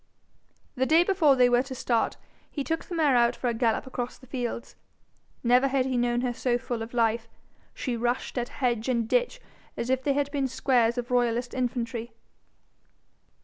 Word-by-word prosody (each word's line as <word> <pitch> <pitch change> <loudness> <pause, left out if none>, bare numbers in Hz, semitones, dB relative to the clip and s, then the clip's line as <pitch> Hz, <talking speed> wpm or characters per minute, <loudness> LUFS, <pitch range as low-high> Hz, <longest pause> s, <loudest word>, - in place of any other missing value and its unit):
The 260 -1 0
day 325 +2 +5
before 350 -7 +4
they 250 -1 +5
were 245 0 +4
to 265 0 -7
start 240 -2 0 0.3
he 285 - -4
took 325 +3 -2
the 350 - -6
mare 300 -5 +3
out 235 -1 +3
for 250 - -2
a - - 0
gallop 225 -1 0
across 250 -2 -5
the 260 - -17
fields. 240 -2 -5 0.7
Never 250 +3 +4
had 265 -1 +1
he 260 -1 -1
known 240 0 +1
her 250 -1 -1
so 240 0 0
full 245 -2 -4
of 225 +2 -7
life. 230 -1 +1 0.5
She 250 -3 -2
rushed 240 +2 -2
at 240 - -3
hedge 240 -2 -1
and 235 -3 +1
ditch - - +1 0.4
as 235 +2 -2
if 260 0 +1
they 280 +1 +1
had 285 0 -1
been 280 -2 0
squares 245 -2 +2
of 245 0 -4
royalist 245 0 +1
infantry. 235 -2 -3
245 Hz, 190 wpm, -27 LUFS, 235-265 Hz, 0.7 s, day